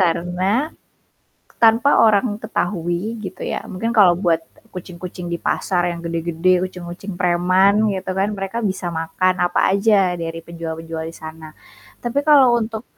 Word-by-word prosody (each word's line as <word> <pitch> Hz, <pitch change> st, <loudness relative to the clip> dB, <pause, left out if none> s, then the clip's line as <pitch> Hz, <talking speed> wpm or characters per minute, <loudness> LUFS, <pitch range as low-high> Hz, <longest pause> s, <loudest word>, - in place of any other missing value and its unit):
Karena, 185 Hz, -, 0 dB, 0.9 s
tanpa 230 Hz, +5 st, +5 dB
orang 215 Hz, 0 st, +3 dB
ketahui 195 Hz, +1 st, -2 dB
gitu 190 Hz, -3 st, -7 dB
ya, -, -, -3 dB
mungkin 225 Hz, +5 st, -3 dB
kalau 185 Hz, -6 st, +5 dB
buat 170 Hz, -3 st, +1 dB, 0.3 s
kucing-kucing 180 Hz, -1 st, -8 dB
di 170 Hz, -, -2 dB
pasar 175 Hz, +1 st, 0 dB
yang 170 Hz, -, -8 dB
gede-gede. 170 Hz, +2 st, 0 dB
kucing-kucing 180 Hz, +2 st, -8 dB
preman 185 Hz, +4 st, +3 dB
gitu 190 Hz, 0 st, -4 dB
kan, 195 Hz, +2 st, +1 dB
mereka 195 Hz, +2 st, -4 dB
bisa 190 Hz, -2 st, -2 dB
makan 170 Hz, +3 st, 0 dB
apa 175 Hz, -, +2 dB
aja 200 Hz, -3 st, +3 dB
dari 165 Hz, 0 st, -5 dB
penjual-penjual 165 Hz, -1 st, -6 dB
disana. 160 Hz, -1 st, -10 dB, 0.5 s
Tapi 240 Hz, +3 st, -1 dB
kalau 270 Hz, -5 st, +6 dB
untuk 220 Hz, -1 st, -4 dB
185 Hz, 135 wpm, -20 LUFS, 170-210 Hz, 0.9 s, kalau